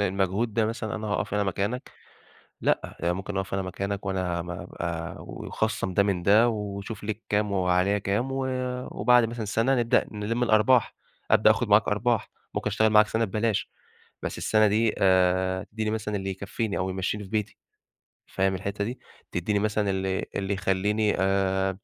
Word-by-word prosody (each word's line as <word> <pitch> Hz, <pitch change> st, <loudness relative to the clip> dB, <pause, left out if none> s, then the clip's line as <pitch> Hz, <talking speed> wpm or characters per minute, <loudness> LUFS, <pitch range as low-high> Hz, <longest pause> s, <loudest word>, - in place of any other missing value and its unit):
المجهود 100 Hz, +3 st, 0 dB
ده 110 Hz, -1 st, +2 dB
مثلًا 110 Hz, -1 st, -3 dB
أنا 110 Hz, 0 st, -4 dB
هاقَف 100 Hz, 0 st, -1 dB
أنا 105 Hz, -, +2 dB
مكانك، 100 Hz, +6 st, -2 dB, 0.7 s
لأ -, -, 0 dB
يعني 85 Hz, +1 st, +1 dB
ممكن 95 Hz, +2 st, -4 dB
أقَف 95 Hz, 0 st, -3 dB
أنا 95 Hz, -, 0 dB
مكانك 100 Hz, +2 st, -4 dB
وأنا 90 Hz, -3 st, -1 dB
م 85 Hz, -, -8 dB
ابقى 85 Hz, -1 st, -5 dB
ويخصّم 95 Hz, -, -3 dB
ده 100 Hz, -, +4 dB
من 95 Hz, -3 st, -1 dB
ده 110 Hz, +5 st, +5 dB
وشوف 105 Hz, 0 st, -5 dB
ليك 110 Hz, +1 st, -4 dB
كام 105 Hz, 0 st, +1 dB
وعليَّ 95 Hz, +1 st, +2 dB
كام 105 Hz, +7 st, -1 dB
و 135 Hz, 0 st, -1 dB, 0.5 s
وبَعد 125 Hz, -1 st, +4 dB
مثلًا 115 Hz, -1 st, -4 dB
سَنَة 115 Hz, +6 st, +2 dB
نبدأ 120 Hz, -2 st, +2 dB
نلِم 110 Hz, +3 st, -1 dB
الأرباح، 115 Hz, +2 st, +3 dB, 0.4 s
أبدأ 110 Hz, 0 st, +6 dB
آخُد 110 Hz, +1 st, -1 dB
معاك 105 Hz, +1 st, +5 dB
أرباح، 110 Hz, +2 st, 0 dB, 0.2 s
ممكن -, -, -2 dB
أشتغل 110 Hz, +1 st, +3 dB
معاك 105 Hz, 0 st, +6 dB
سَنَة 110 Hz, +1 st, 0 dB
ببلاش، 110 Hz, +1 st, -1 dB, 0.5 s
بس -, -, -3 dB
السنة 110 Hz, -1 st, +3 dB
دي 110 Hz, +2 st, +2 dB
آآ، 95 Hz, 0 st, +3 dB
تدّيني 110 Hz, 0 st, -3 dB
مثلًا 105 Hz, -1 st, -2 dB
اللي 95 Hz, -1 st, -3 dB
يكفّيني 100 Hz, +3 st, -3 dB
أو 95 Hz, 0 st, -1 dB
يمشّيني 95 Hz, +3 st, -2 dB
في 95 Hz, -, -11 dB
بيتي، 105 Hz, 0 st, -2 dB, 0.7 s
فاهم 95 Hz, 0 st, 0 dB
الحِتّة 100 Hz, +2 st, -3 dB
دي؟ 120 Hz, +3 st, -5 dB, 0.3 s
تدّيني 100 Hz, +4 st, 0 dB
مثلًا 105 Hz, -1 st, 0 dB
اللي 95 Hz, 0 st, -1 dB
اللي 100 Hz, 0 st, -1 dB
يخلّيني 100 Hz, +3 st, +1 dB
آآ 95 Hz, 0 st, +1 dB
100 Hz, 170 wpm, -26 LUFS, 95-110 Hz, 0.7 s, أبدأ